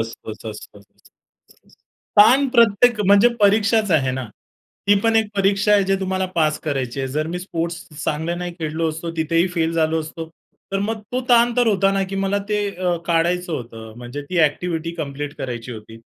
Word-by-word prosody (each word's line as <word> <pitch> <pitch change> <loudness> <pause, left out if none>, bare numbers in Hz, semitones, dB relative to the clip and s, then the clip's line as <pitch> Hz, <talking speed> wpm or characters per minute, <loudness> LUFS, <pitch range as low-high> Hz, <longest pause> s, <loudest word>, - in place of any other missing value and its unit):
असतच, 115 0 -7 0.3
असतं. 100 0 -25 0.5
ताण 260 +6 +6
प्रत्येक 235 -1 +4
म्हणजे 200 +4 +6
परीक्षाच 210 0 +3
आहे 135 -5 +2
ना. 130 0 -4 0.6
ती 205 - +6
पण 225 +1 +2
एक 220 -1 +3
परीक्षा 200 +1 +2
आहे, 205 -1 +5
जे 195 0 +1
तुम्हाला 190 0 -1
पास 155 -2 +1
करायची 135 -4 -3
आहे. 135 - -2
जर 150 +4 -2
मी - - -2
स्पोर्ट्स 170 -2 -4 0.2
चांगलं 160 +3 -2
नाही 175 0 -4
खेळलो 160 +1 -1
असतो, 165 +2 -6
तिथेही 165 +2 +1
फेल 165 -1 0
झालो 160 -1 +1
असतो. 160 +1 -7 0.4
तर 195 - +1
मग 220 +2 -2
तो 255 - 0
ताण 240 0 +5
तर 245 - +3
होता 195 -2 +3
ना, 195 - +1
की 195 +1 -6
मला 200 +1 0
ते 210 - 0 0.2
अ, 180 -1 0
काढायचं 175 +1 0
होतं. 115 -5 -7
म्हणजे 125 +4 -7
ती 180 - 0
एक्टिव्हिटी 165 +2 -2
कंप्लीट 145 -2 -5
करायची 120 -1 -5
होती. 110 0 -11
170 Hz, 180 wpm, -21 LUFS, 150-200 Hz, 0.6 s, ताण